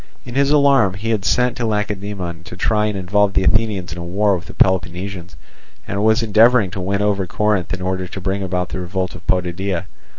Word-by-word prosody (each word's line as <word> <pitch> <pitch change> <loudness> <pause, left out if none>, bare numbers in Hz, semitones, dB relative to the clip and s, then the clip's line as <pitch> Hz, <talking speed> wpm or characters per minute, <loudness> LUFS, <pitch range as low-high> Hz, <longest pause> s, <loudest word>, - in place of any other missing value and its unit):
In 120 - -8
his 140 +1 +2
alarm 140 -9 +4
he 110 +4 -3
had 105 -3 0
sent 125 -1 +2
to 120 - -1
Lacedaemon 100 -5 -3
to 90 - -9
try 105 +2 +1
and 105 -2 -3
involve 100 +2 +1
the 95 - +2
Athenians 100 -3 +1
in 85 - -8
a - - -5
war 100 +3 +1
with 90 - -7
the - - -11
Peloponnesians, 90 -1 0 0.5
and 100 +1 -2
was 110 +2 +3
endeavouring 110 -1 +4
to 95 - -5
win 100 +2 -1
over 100 -3 0
Corinth 105 -3 0
in 90 0 -3
order 95 0 -2
to 95 - -7
bring 95 +2 -2
about 90 -1 -2
the - - -5
revolt 90 +1 -3
of 85 +1 -12
Potidæa. 90 +1 -1
95 Hz, 210 wpm, -19 LUFS, 90-105 Hz, 0.5 s, alarm